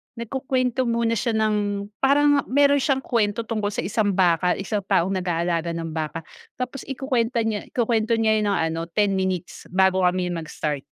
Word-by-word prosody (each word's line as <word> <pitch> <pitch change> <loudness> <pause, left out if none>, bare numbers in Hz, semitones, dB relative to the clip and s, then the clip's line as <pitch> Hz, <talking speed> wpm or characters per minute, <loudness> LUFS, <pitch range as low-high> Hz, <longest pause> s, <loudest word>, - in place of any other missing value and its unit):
nagkukuwento 255 +1 -1
muna 230 0 +1
siya 230 0 0
ng, 205 -2 0
parang 290 +1 +4
meron 285 +1 +4
siyang 270 -1 0
kuwento 225 -1 0
tungkol 215 -2 -2
sa 205 - -3
isang 205 0 0
baka, 180 -1 +3
isang 205 +1 -2
taong 185 +3 +2
nag-aalaga 170 -2 -1
ng 165 -1 -4
baka, 160 0 -4 0.3
tapos 255 +1 -5
ikukuwenta 250 -4 0
niya 215 -2 -2
ikukuwento 230 -1 +1
niya 220 -1 +2
ng 210 - 0 0.2
ano, 165 +1 -4
10 205 +3 +1
minutes 190 -2 -3
bago 190 0 +3
kami 180 0 0
mag-start. 155 -3 -3
210 Hz, 160 wpm, -23 LUFS, 180-235 Hz, 0.3 s, parang